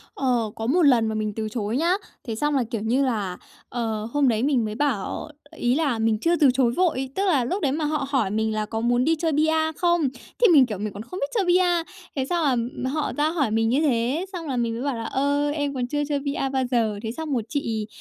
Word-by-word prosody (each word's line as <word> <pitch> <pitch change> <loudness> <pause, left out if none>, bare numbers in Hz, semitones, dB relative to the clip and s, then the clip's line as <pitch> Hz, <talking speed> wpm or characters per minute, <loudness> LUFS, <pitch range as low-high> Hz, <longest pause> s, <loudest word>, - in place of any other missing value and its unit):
Ờ, 240 -5 0
có 225 +1 -4
một 345 +7 +3
lần 245 -7 +5
mà 220 - -2
mình 215 -1 -2
từ 220 -1 -3
chối 220 +1 -2
nhá. 340 +4 +2 0.3
Thế 225 - -2
xong 295 +4 0
là, 260 - +2
kiểu 225 -3 -2
như 245 +5 +1
là, 205 -7 -2 0.3
ờ, 220 -3 -2
hôm 290 -2 +3
đấy 225 0 +1
mình 265 -6 +2
mới 215 - -4
bảo 270 0 -2 0.3
ý 245 +1 +1
là 280 -7 0
mình 220 -1 +2
chưa 340 +5 +2
từ 295 -5 +5
chối 250 -3 +2
vội, 270 -4 0
tức 395 +1 0
là 285 -10 +2
lúc 380 +10 -2
đấy 280 - +1
mà 300 +2 -1
họ 300 -2 -1
hỏi 250 -9 +1
mình 220 0 0
là 215 0 -1
"Có 225 +1 -4
muốn 245 +1 +2
đi 325 +2 +3
chơi 325 0 -1
bi-a 315 +1 +2
không?" 345 -2 +1 0.3
thì 475 - +6
mình, 275 -4 +7
kiểu, 215 -5 -5
mình 210 +1 -4
còn 205 +2 -7
không 365 +11 -7
biết 280 - 0
chơi 400 -4 +2
bi-a, 355 -1 +3 0.3
thế 265 -2 0
xong 270 -8 +1
là 260 - -3
họ 300 +2 -2
ra 300 +1 +2
hỏi 285 -9 0
mình 225 0 +2
như 270 +6 +2
thế, 270 +5 +1
xong 335 -4 -5
là 260 -3 -2
mình 230 -1 0
mới 235 - -4
bảo 275 -4 -1
là 225 - -4
"Ơ, 285 +4 0
em 290 -2 -2
còn 250 -2 -2
chưa 290 +2 -1
chơi 285 -1 +1
bi-a 280 -1 -2
bao 265 -1 0
giờ." 220 -4 +1
Thế 220 - -2
xong 310 +3 -4
rồi 240 -4 0
chị 225 -7 -2
265 Hz, 265 wpm, -24 LUFS, 225-300 Hz, 0.3 s, mình